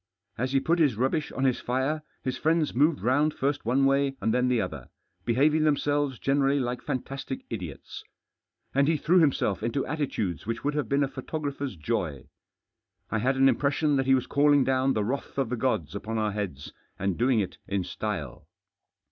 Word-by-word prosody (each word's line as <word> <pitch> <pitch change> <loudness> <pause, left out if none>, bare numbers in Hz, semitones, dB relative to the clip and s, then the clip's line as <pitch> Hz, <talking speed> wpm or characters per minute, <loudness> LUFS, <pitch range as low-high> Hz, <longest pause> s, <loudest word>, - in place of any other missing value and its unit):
As 130 +3 -2
he 135 - +3
put 170 +5 +1
his 145 -8 +3
rubbish 135 +7 0
on 135 - -2
his 130 -2 +2
fire, 130 +5 -1 0.2
his 130 -1 -2
friends 160 0 +1
moved 145 +4 +3
round 145 +6 +2
first 140 -1 -1
one 130 +4 +3
way 135 0 +2
and 110 - 0
then 125 0 +2
the 125 -2 +2
other, 80 - -4 0.4
behaving 150 +6 +3
themselves 145 -3 +1
generally 140 +2 +2
like 125 -1 -2
fantastic 135 -1 -5
idiots. 90 -10 -7 0.7
And 140 +1 +3
he 160 0 +3
threw 180 +5 +3
himself 140 - +2
into 115 +5 -1
attitudes 110 - -3
which 115 0 -3
would 145 - 0
have 145 -6 -2
been 140 +1 +2
a - - +1
photographer's 140 -1 -4
joy. 80 - -3 0.8
I 110 - +1
had 130 +4 +1
an 135 0 +5
impression 145 +2 +2
that 135 0 0
he 135 - +6
was 130 - 0
calling 145 -1 +4
down 130 +1 +2
the 105 - 0
wrath 135 +7 -4
of 135 -4 0
the 125 - -1
gods 110 - -1
upon 110 +2 -4
our 110 -1 0
heads, 95 -9 -5 0.2
and 95 -1 -1
doing 120 +2 +2
it 100 - -3
in 100 -2 -1
style. 90 - -5
130 Hz, 190 wpm, -27 LUFS, 110-145 Hz, 0.8 s, he